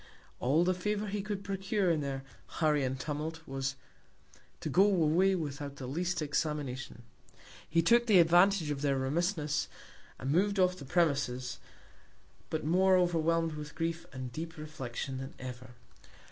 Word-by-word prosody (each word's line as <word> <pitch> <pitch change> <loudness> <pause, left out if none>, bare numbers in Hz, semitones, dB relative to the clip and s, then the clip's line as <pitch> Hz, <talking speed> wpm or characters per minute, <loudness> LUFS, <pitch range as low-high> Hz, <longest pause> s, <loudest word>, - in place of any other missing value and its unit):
All 145 +7 +3
the 185 +1 +2
Favour 210 +3 -2
he 205 0 -2
could 200 -1 -4
procure, 195 -1 0
in 155 -2 +1
their 135 -1 -3 0.4
Hurry 150 -3 +3
and 130 0 -2
Tumult, 155 +3 -4
was, 135 0 -2 0.8
to - - -4
go 190 - +5
away 190 -1 +3
without 145 -4 -4
the 135 - -7
least 170 +5 -1
Examination. 145 -5 -3 0.7
He 165 0 +3
took 235 +6 +4
the 210 -4 +6
Advantage 175 0 +5
of 140 -1 -3
their 140 -2 +1
Remissness, 150 +2 0 0.5
and 135 - -3
mov'd 200 +5 +2
off 180 -1 +3
the 145 - -10
Premises, 135 -6 0 0.9
but 155 -2 -2
more 185 +3 +4
overwhelm'd 165 -2 +2
with 150 0 -7
Grief 165 0 -2
and 130 -1 -6
deep 160 +5 -6
Reflection 135 -4 -5
than 135 +2 -7
ever. 125 -1 -8
160 Hz, 150 wpm, -31 LUFS, 140-180 Hz, 0.9 s, the